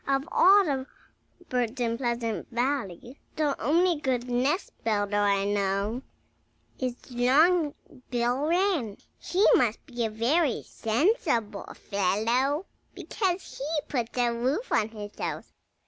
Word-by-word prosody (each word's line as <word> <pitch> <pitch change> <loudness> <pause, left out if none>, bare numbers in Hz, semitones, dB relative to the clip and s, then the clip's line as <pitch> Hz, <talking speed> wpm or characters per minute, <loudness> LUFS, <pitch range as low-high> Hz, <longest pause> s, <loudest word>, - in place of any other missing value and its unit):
Of 275 +2 0
all 395 +1 +6
the 270 -4 -2 0.6
birds 250 0 -1
in 230 -1 0
Pleasant 235 -3 -2
Valley 245 -1 -3 0.2
the 295 -3 +1
only 335 +7 +3
good 250 -3 -1
nest 260 +9 0
builder 205 -2 0
I 200 -1 +2
know 200 +3 -1 0.8
is 255 -2 -2 0.2
Long 290 +6 +3 0.3
Bill 245 +4 0
Wren. 335 - +1 0.2
He 380 +4 +1
must 230 -3 +2
be 245 -4 -4
a - - -1
very 250 +7 +1
sensible 230 - 0
fellow, 230 - 0 0.3
because 375 -3 -3
he 300 +3 -1
puts 240 -3 -3
a 240 -1 +2
roof 260 - -1
on 215 - +2
his 210 -2 -8
house." - - -5
245 Hz, 125 wpm, -27 LUFS, 225-295 Hz, 0.8 s, all